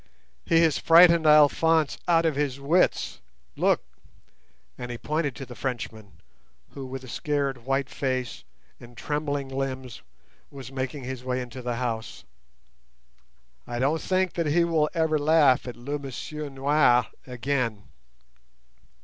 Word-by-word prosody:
"He 165 -1 +4
has 160 -3 +2
frightened 170 -1 +6
Alphonse 155 +1 +4
out 165 -1 +3
of 160 -3 +1
his 140 -2 -1
wits; 160 +7 +1 0.4
look!" - - +2 0.9
and 125 - -7
he 120 - -5
pointed 150 0 -2
to 135 - -7
the 125 - -10
Frenchman, 115 -5 -5 0.6
who, 135 -2 -8
with 130 0 -7
a - - -10
scared 135 -2 -2
white 135 0 0
face 130 -4 -3 0.4
and 120 0 -15
trembling 145 -1 -2
limbs, 130 -2 -5 0.5
was 135 -2 -10
making 135 +1 -4
his 130 0 -6
way 130 0 -2
into 125 +1 -7
the 120 -1 -3
house. 115 -2 -4 1.4
"I 120 - -4
don't 145 +6 +1
think 185 -1 0
that 170 -2 -1
he 165 +4 +3
will 160 -3 +1
ever 160 -2 +1
laugh 145 -4 +4
at 125 - -6
'le 140 +5 -4
monsieur 145 +2 -6
noir' 135 -2 +3 0.2
again." 125 -4 -2
135 Hz, 140 wpm, -26 LUFS, 125-155 Hz, 1.4 s, frightened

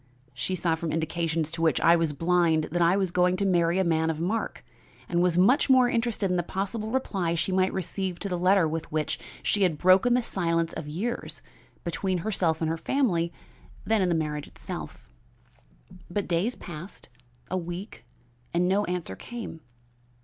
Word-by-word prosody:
She 160 +9 -2
saw 170 -2 +1
from 160 0 -2
indications 160 -1 -1
to 165 +1 -4
which 160 -1 +3
I 170 - +6
was 165 -2 +1
blind 165 0 +2
that 175 +1 0
I 170 +3 +4
was 190 -3 0
going 180 +1 +3
to 200 - 0
marry 175 -2 +2
a 190 - +3
man 160 -2 +1
of 160 -1 -2
mark, 205 - -2 0.4
and 175 -1 +1
was 175 -1 +2
much 245 +11 +4
more 255 -1 +6
interested 230 -5 0
in 180 - +1
the - - +2
possible 200 +5 -3
reply 195 -9 -1
she 175 +3 -1
might 185 0 +2
receive 190 0 -3
to - - -2
the 180 -2 -2
letter 185 -1 +4
with 160 +1 -4
which 155 0 -1 0.2
she 205 - +1
had 175 -5 +3
broken 185 +9 +5
the 250 - +1
silence 165 -5 0
of 150 - -6
years 205 +11 -4 0.4
between 185 +2 -1
herself 170 -7 +1
and 160 - +1
her 165 - -2
family 170 - +1 0.5
than 220 -2 +2
in 185 - +2
the 170 - +2
marriage 150 -2 -2
itself. - - -8 1.0
"But 200 +3 -2
days 185 +8 0
passed, 175 +3 -9 0.4
a 185 - +1
week, 175 +4 -7 0.5
and 175 +1 +3
no 200 +2 +2
answer 175 - -3
came. 230 - -7
175 Hz, 185 wpm, -27 LUFS, 165-195 Hz, 1.0 s, I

